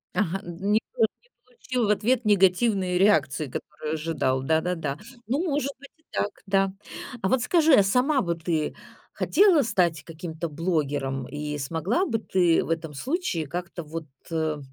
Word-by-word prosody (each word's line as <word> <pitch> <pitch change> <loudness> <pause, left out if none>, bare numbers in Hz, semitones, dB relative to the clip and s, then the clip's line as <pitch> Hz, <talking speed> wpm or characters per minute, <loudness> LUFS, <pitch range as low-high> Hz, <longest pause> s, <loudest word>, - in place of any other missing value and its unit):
Ага, 195 -2 0
д 175 +3 -8
не 210 +2 +4 0.2
по 475 - -3
не - - +6 0.4
получил 250 -2 -2
в - - -1
ответ 230 +4 +1
негативной 190 -1 +3
реакции, 155 -7 +3
которую 150 +4 -5
ожидал. 150 -5 0
Да-да-да. 160 -1 0 0.3
Ну, 275 +9 0
может 280 -4 0
быть, 280 - -13
и 315 - -33
так, 205 - 0 0.2
да. 195 0 +2 0.5
А 190 - +1
вот 260 - +2
скажи, 320 +3 +4
а 205 - +7
сама 255 +8 +2
вот 170 -2 -3
ты 160 -4 -1 0.4
хотела 380 -6 +4
стать 180 - +1
каким-то 165 0 -6
блогером, 145 -5 -1
и 150 +1 -4
смогла 165 - 0
бы 225 -9 -1
ты 180 -5 +2
в - - -8
этом 160 -2 -2
случае 240 - -2
как-то 175 +2 -5
вот, 160 0 -6 0.2
э, 160 -2 0
180 Hz, 165 wpm, -26 LUFS, 160-225 Hz, 0.5 s, а